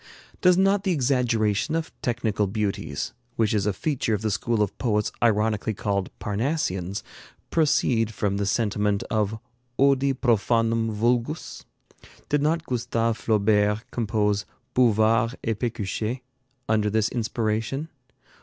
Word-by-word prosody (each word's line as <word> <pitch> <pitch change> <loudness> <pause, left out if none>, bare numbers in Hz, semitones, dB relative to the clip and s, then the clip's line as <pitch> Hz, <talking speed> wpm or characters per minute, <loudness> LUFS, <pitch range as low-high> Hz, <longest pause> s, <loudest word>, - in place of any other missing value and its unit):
Does 180 -1 +5
not 195 +1 +3
the 195 - +1
exaggeration 125 - +1
of 165 0 -2
technical 115 -6 0
beauties, 100 0 -3 0.2
which 110 -2 +1
is 105 -2 +1
a - - +3
feature 120 0 -1
of 105 - -5
the 110 - 0
school 115 +1 +1
of 100 - -4
poets 105 -4 +1
ironically 110 -1 +1
called 100 -1 -1
Parnassians, 100 - -2 0.5
proceed 125 -8 +2
from 100 -2 -1
this 100 -1 0
sentiment 105 -3 0
of 110 0 0 0.4
Odi 140 0 +4
profanum 115 -1 +2
vulgus? 120 +7 -1 0.6
Did 145 -1 +2
not 160 +2 +1
Gustave 115 -2 0
Flaubert 105 -1 +2
compose 105 -3 0 0.3
'Bouvard 115 0 +3
et 115 -2 -1
Péchuchet' 115 +1 -2 0.5
under 105 -1 +2
this 110 0 +2
inspiration? 115 +4 -2
110 Hz, 125 wpm, -25 LUFS, 105-125 Hz, 0.6 s, Does